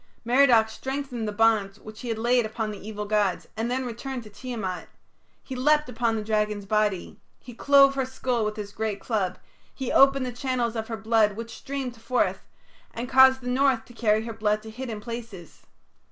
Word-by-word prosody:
Merodach 240 -2 +5
strengthened 265 -1 -4
the - - -2
bonds 210 -2 +2
which 215 0 -11
he 250 - -7
had 225 -2 -2
laid 240 +2 +2
upon 220 0 -3
the 205 0 -9
evil 210 -1 -5
gods 205 -3 0
and 225 +2 -2
then 260 +1 -1
returned 245 +1 -5
to 215 - -13
Tiamat. 205 -5 -5 0.5
He 265 - -7
leapt 300 +3 +2
upon 230 -1 0
the 215 - -2
dragon's 210 -1 -1
body; 210 -2 -1 0.2
he 245 - -12
clove 275 +2 +5
her 270 -1 0
skull 255 -2 -2
with 210 0 -2
his 205 -1 -6
great 215 -1 -3
club; 195 -5 -2 0.4
he 265 -2 -3
opened 275 -1 +5
the 250 - -3
channels 245 -1 -2
of 220 -1 -3
her 225 - -4
blood 220 0 +2
which 230 +1 -7
streamed 260 -4 -5
forth, 250 +2 0 0.5
and 235 +2 -5
caused 265 0 +6
the 250 - -8
north 255 -2 +2
to 240 - -15
carry 220 -2 +1
her 230 - -5
blood 215 -1 0
to 220 - -9
hidden 225 -2 -6
places. 230 -7 -8
230 Hz, 195 wpm, -26 LUFS, 215-255 Hz, 0.5 s, caused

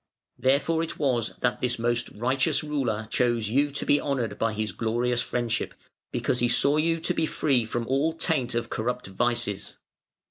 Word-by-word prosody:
Therefore 140 +5 +2
it 165 - -4
was 125 -7 0
that 125 - 0
this 125 -1 0
most 120 +1 0
righteous 130 +8 +1
ruler 130 -8 -1
chose 120 -4 +1
you 140 +4 +3
to 140 - -4
be 145 - +3
honoured 120 -7 -2
by 115 0 +1
his 110 0 -2
glorious 120 +2 0
friendship, 120 -1 -2 0.4
because 125 - 0
he 120 - +3
saw 140 +4 +3
you 165 +1 +2
to 160 - -1
be 160 - 0
free 135 -8 +1
from 115 +1 -2
all 140 +5 +1
taint 150 -7 0
of 120 - -2
corrupt 125 +2 -2
vices. 100 0 -1
125 Hz, 175 wpm, -26 LUFS, 115-140 Hz, 0.4 s, you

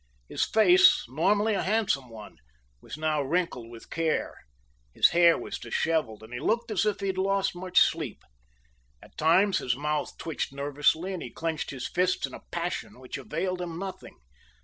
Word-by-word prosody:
His - - 0
face, 355 - +5
normally 205 - +1
a 195 - 0
handsome 190 - 0
one, 110 -2 -11 0.4
was - - -9
now 155 -1 0
wrinkled 140 -5 -2
with 115 -1 -13
care, 165 -1 -1 0.6
his - - +6
hair 170 0 +5
was - - -6
disheveled, 150 -10 -1
and 110 +2 -12
he 120 - -4
looked 230 - 0
as 215 0 +1
if 205 -1 -1
he - - -2
had 190 -1 -1
lost 195 -1 +1
much 180 +1 +2
sleep. - - 0 0.8
At - - -18
times 185 +6 +3
his 125 -1 -1
mouth 150 +2 -2
twitched 160 -4 -4
nervously 145 +6 0
and 180 - -5
he 125 - -6
clenched 160 +5 -3
his 130 -3 -5
fists 180 +1 0
in - - -11
a - - -9
passion 175 -6 -4
which 130 -1 -7
availed 185 -4 -3
him 170 -2 -5
nothing. 190 +1 -7
170 Hz, 175 wpm, -27 LUFS, 145-195 Hz, 0.8 s, his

